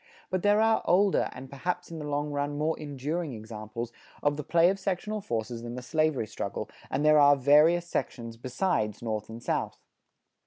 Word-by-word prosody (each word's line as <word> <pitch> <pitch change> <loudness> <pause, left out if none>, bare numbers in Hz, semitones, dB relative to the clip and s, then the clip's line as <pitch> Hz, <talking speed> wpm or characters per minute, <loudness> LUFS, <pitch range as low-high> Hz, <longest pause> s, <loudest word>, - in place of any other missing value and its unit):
But 185 -1 0
there 205 +2 +4
are 220 0 +3
older, 195 +2 +3
and 130 +1 -9
perhaps 175 +6 -4
in 165 - -6
the 150 - -5
long 145 +1 -1
run 145 0 -2
more 155 +2 +1
enduring 150 +2 -3
examples 110 +1 -6 0.3
of 145 0 +2
the 150 - -4
play 170 +4 +4
of 195 - -4
sectional 200 +3 -2
forces 115 - -3
than 120 0 -6
the 125 - -6
slavery 155 -3 +1
struggle, 105 -2 -5 0.2
and 145 +3 0
there 155 0 +7
are 145 0 +7
various 150 +6 +5
sections 115 -8 -3
besides 120 - -1
North 110 -2 -3
and 115 +1 -9
South. - - -1
145 Hz, 185 wpm, -28 LUFS, 120-170 Hz, 0.3 s, there